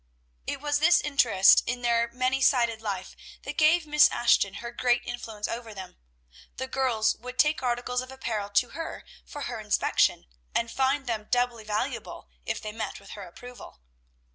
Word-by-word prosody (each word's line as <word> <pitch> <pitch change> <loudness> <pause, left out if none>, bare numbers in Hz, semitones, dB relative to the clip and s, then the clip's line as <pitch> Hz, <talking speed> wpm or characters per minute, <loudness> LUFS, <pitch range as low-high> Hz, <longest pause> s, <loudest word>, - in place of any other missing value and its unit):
It - - -4
was 290 0 0
this 345 +3 +5
interest 245 -10 +5
in 245 +1 -3
their 235 0 +2
many 255 +2 0
sided 235 -4 +2
life 195 -4 -5 0.3
that - - -6
gave 315 +1 +4
Miss 300 0 +5
Ashton 235 -5 +2
her 235 0 -6
great 240 0 +1
influence 225 -3 -5
over 230 -2 -6
them. 190 -2 -9 0.6
The 260 - -3
girls 255 -5 +1
would 250 +2 -9
take 300 -1 +3
articles 250 0 -1
of 255 +1 -9
apparel 225 -6 -4
to 235 +4 +2
her 330 -1 -7 0.2
for 290 - -9
her 240 -4 -4
inspection, 210 -1 +1 0.3
and 230 0 0
find 270 +1 0
them 220 -3 -3
doubly 245 -3 0
valuable 210 - -4 0.2
if - - -2
they 215 - -6
met 220 +1 -5
with 200 - -14
her 200 -3 -8
approval. 245 - -12
240 Hz, 170 wpm, -27 LUFS, 220-265 Hz, 0.6 s, this